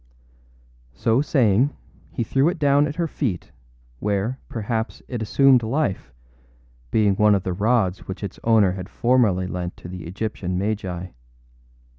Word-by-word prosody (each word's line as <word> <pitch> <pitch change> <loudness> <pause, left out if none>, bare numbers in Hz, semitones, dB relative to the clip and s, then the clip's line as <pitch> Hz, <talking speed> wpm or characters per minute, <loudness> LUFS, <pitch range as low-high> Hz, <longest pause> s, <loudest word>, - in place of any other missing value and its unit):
â - - -32
So 115 - +2
saying, 130 -2 +2 0.4
he 120 - -2
threw 135 +7 +2
it 180 - -3
down 145 0 +3
at 145 - -5
her 170 0 -1
feet, 120 - -3 0.5
where, 105 +5 -1
perhaps, 110 0 -3
it 120 -3 -4
assumed 130 +3 +4
life, 115 - -2 0.8
being 105 - +3
one 105 -1 +5
of 95 - -1
the 95 - -2
rods 105 -1 0
which 95 +2 -6
its 100 - -6
owner 110 -5 +4
had 95 +1 -6
formerly 115 -8 +2
lent 90 -1 -5
to - - -10
the 90 -2 -8
Egyptian 90 -1 -3
magi. 95 -3 -3
105 Hz, 150 wpm, -23 LUFS, 90-125 Hz, 0.8 s, one